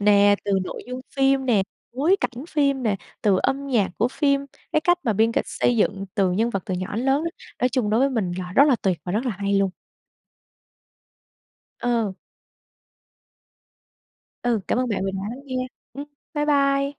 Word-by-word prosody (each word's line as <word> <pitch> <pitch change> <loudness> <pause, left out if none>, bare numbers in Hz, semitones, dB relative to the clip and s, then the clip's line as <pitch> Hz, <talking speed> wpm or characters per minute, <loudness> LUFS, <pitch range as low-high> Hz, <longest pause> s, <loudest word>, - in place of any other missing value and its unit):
nè, 205 0 +5
từ 200 - 0
nội - - -6
dung 250 +1 -5 0.2
phim 270 -1 +3
nè, 215 -6 +4 0.3
bối 310 +10 +3
cảnh 250 +3 -3
phim 280 -3 +1
nè, 210 -4 +1 0.3
từ 195 -3 +4
âm 280 +1 0
nhạc 225 -9 +1
của 235 - +3
phim, 280 +1 +1 0.3
cái 310 - +3
cách 350 +2 +3
mà 225 - +2
biên 225 +3 +2
kịch - - 0
xây 245 - +1
dựng 200 -2 +1
từ 195 -4 +2
nhân 225 +5 +1
vật 195 -5 -2
từ 185 - -1
nhỏ 185 +3 -4
đến 245 - -1
lớn 275 +3 +3
á. 335 - -1 0.3
Nói 250 - +3
chung 240 -4 0
đối 220 - +3
với 275 +1 +3
mình 205 -8 -1
là 180 0 -5
rất 280 - +7
là 255 - +4
tuyệt 185 -4 +1
và 180 - -3
rất 230 +5 0
là - - +1
hay 200 0 0
luôn. 195 -1 +2 2.1
Ờ. 230 -5 0 2.3
Ừ, 235 -3 +1
cảm - - +1
ơn 255 -1 0
bạn 200 -3 -1
vì 195 - -1
đã 195 - -3
lắng 255 +3 -7
nghe. 255 -1 -2 0.3
Ừm. 285 +1 -6 0.3
Bye 295 0 +1
bye. 275 -1 +3
240 Hz, 200 wpm, -23 LUFS, 200-275 Hz, 2.3 s, rất